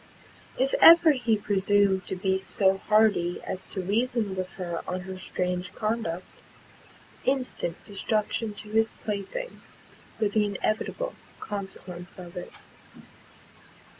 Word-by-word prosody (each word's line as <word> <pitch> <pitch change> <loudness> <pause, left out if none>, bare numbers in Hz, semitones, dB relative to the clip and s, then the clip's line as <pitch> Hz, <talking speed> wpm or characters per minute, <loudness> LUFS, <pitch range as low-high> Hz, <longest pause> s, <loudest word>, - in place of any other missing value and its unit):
If 270 +1 +1
ever 335 -1 +10
he 245 -5 +1
presumed 200 -1 +2
to - - -2
be 190 +1 +1
so 190 0 +2
hardy 210 -5 +3
as 185 - -5
to 190 - -4
reason 220 0 0
with 185 -1 -3
her 175 -3 -4
on 185 0 -2
her 190 +1 -7
strange 180 -1 -3
conduct, 215 -6 -2 1.0
instant 255 -10 0
destruction 210 +1 -1
to 210 +1 -8
his 220 +1 +2
playthings 215 - -5 0.4
were 215 -2 +2
the 210 +1 +2
inevitable 215 - -2 0.3
consequence 190 -3 -7
of 175 -2 -10
it. 180 - -6
200 Hz, 120 wpm, -27 LUFS, 185-220 Hz, 1.0 s, ever